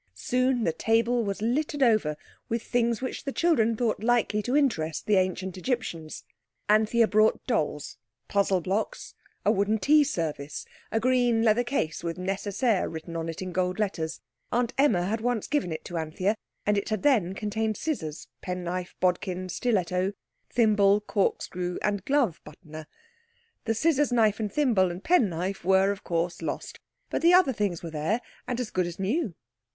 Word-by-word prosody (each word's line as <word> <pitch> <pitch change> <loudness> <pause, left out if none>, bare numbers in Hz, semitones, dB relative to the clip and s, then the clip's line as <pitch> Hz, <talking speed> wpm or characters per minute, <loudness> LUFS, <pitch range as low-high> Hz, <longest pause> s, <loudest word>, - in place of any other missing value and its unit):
Soon 250 - +1
the 165 - +1
table 230 +5 +2
was 200 0 -3
littered 285 +4 0
over 215 -11 +2 0.3
with 230 0 -1
things 235 0 0
which 260 - -4
the 275 - -3
children 230 -10 +2
thought 225 -4 0
likely 230 -3 +2
to 250 +6 +1
interest 160 - 0
the 210 -2 +3
Ancient 185 0 -1
Egyptians. 175 -9 -3 0.4
Anthea 220 +2 +4
brought 215 +1 +3
dolls, 150 - -2 0.3
puzzle 195 -2 +2
blocks, 205 - -3 0.3
a 205 - +5
wooden 210 +1 +1
tea 295 +8 +5
service, 155 - -3 0.3
a 225 - +1
green 245 -2 +2
leather 230 +2 +4
case 240 - -2
with 165 -1 -3
Nécessaire 195 +3 0
written 165 +1 -7
on 165 0 -3
it 165 +3 -5
in 185 - -5
gold 180 +1 -1
letters. 170 -6 -2 0.3
Aunt 245 0 0
Emma 265 -11 +3
had 215 +4 -1
once 240 -2 0
given 290 - -1
it 160 - -5
to 175 - -5
Anthea, 160 +6 0 0.3
and 210 0 +3
it - - -6
had 215 -3 -2
then 205 -10 +3
contained 215 +1 -2
scissors, 160 - -4
penknife, 180 0 -4
bodkin, 185 0 0
stiletto, 185 -2 0 0.4
thimble, 210 -3 +4
corkscrew, 180 -3 -1
and 205 -2 0
glove 270 - +1
buttoner. 155 0 -11 0.8
The 225 0 0
scissors, 295 +1 +2
knife, 220 -3 +3
and 210 -2 -2
thimble, 225 -9 +2
and 175 +3 -7
penknife 195 - +1
were, 190 +2 +4
of 200 +1 -6
course, 170 0 -2
lost, 165 - -5 0.3
but - - -1
the 345 +2 +6
other 360 -8 +5
things 200 -6 -2
were 165 - -5
there 160 +9 0 0.3
and 245 -1 -2
as 245 -4 -3
good 180 -1 0
as 175 - -7
new. 205 - -1
205 Hz, 165 wpm, -27 LUFS, 180-240 Hz, 0.8 s, the